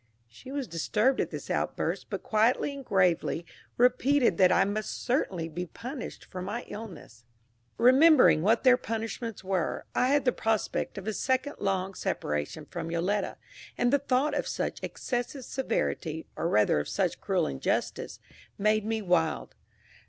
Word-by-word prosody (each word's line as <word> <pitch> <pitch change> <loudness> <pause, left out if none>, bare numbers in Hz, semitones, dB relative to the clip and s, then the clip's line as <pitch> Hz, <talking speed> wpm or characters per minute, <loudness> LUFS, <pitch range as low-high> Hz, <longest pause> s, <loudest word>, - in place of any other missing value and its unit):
She 120 - -12
was 280 -3 -3
disturbed 210 - +1
at - - -2
this - - -6
outburst, - - -1
but - - -4
quietly 225 +6 +2
and 280 -1 -8
gravely 180 -5 +1 0.3
repeated 250 -3 +3
that 185 -1 +6
I - - +4
must 210 +1 -3
certainly 195 - 0
be 175 +3 -5
punished 250 - -7
for 185 - -7
my 205 +6 -4
illness. 185 - -9 0.5
Remembering 260 - +6
what 220 +6 +3
their 255 -2 +6
punishments 225 -2 -4
were, 185 -2 -1
I 250 - +2
had 280 0 +2
the 250 - +4
prospect 220 -3 -1
of 195 - -6
a 220 - 0
second 260 +5 -1
long 195 -1 -1
separation 75 - -3
from 165 -2 -6
Yoletta, 185 +4 -1 0.4
and 245 +2 +2
the 285 - +5
thought 280 +2 +1
of 290 - -1
such - - -3
excessive 245 +1 -4
severity, 165 - -2
or 165 - -1
rather 105 - +3
of 75 - -4
such - - -1
cruel - - +1
injustice, 65 -1 -2 0.4
made 215 +1 +2
me 220 0 -2
wild. 170 -4 +1
215 Hz, 155 wpm, -28 LUFS, 180-255 Hz, 0.5 s, that